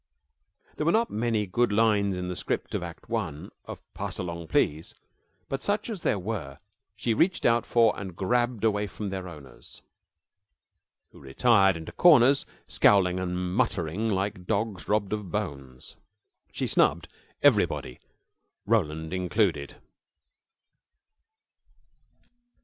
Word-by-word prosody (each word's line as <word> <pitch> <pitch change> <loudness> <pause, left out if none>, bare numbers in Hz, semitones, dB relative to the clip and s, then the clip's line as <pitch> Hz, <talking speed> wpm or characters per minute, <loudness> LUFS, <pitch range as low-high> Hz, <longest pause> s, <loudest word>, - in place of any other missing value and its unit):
There 150 - -2
were - - +5
not 230 +3 +1
many 110 -1 0
good 120 +5 +1
lines 100 -3 +2
in 90 0 -4
the 90 - -4
script - - -3
of - - -1
act 85 -1 -9
one 90 -11 -4
of - - -8
"Pass 100 -2 -5
Along, 85 -2 -5
Please!" 80 +1 0 0.5
but 135 0 -4
such 205 - -1
as 200 -5 -6
there 105 - +1
were 90 -9 -5 0.4
she 115 - -1
reached 180 - +1
out 120 0 +3
for 115 -1 +4
and 95 -4 -7
grabbed 120 +3 0
away 105 -2 +1
from 100 +1 -6
their 95 -1 -5
owners, 75 -7 -13 1.3
who - - -16
retired 95 - +3
into 80 - -8
corners, 140 -5 +5 0.2
scowling 95 -3 +3
and 90 -1 -3 0.2
muttering, 95 +6 0
like 95 -2 -2
dogs 105 -5 -2
robbed 105 -1 0
of 105 -3 -4
bones. 70 -11 -6 0.5
She - - -3
snubbed 85 +3 +2 0.4
everybody, 60 - +2 0.7
Roland 80 -7 0
included. 90 -5 0
100 Hz, 125 wpm, -27 LUFS, 85-115 Hz, 1.3 s, were